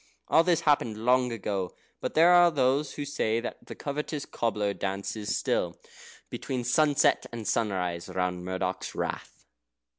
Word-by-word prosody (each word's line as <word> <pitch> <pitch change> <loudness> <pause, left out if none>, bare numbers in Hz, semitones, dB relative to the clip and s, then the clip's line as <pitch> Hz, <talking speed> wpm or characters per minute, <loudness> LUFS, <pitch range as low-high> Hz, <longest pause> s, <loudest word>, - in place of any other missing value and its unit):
All 160 - +6
this 175 -2 +2
happened 130 -8 +2
long 125 0 +3
ago; 100 -4 -3 0.2
but - - -4
there 170 +3 +7
are 175 -1 +7
those 140 -1 +1
who 145 - -4
say 115 -5 0
that 120 - -7
the - - -7
covetous 150 0 -4
cobbler 105 -3 -1
dances 100 +2 -3
still, - - -1 0.5
between 125 -2 -3
sunset 145 +4 +3
and 115 -2 -6
sunrise, 90 -6 -1
round 90 -1 -2
Murdoch's 95 0 -3
Rath. - - -5
115 Hz, 145 wpm, -28 LUFS, 100-145 Hz, 0.5 s, there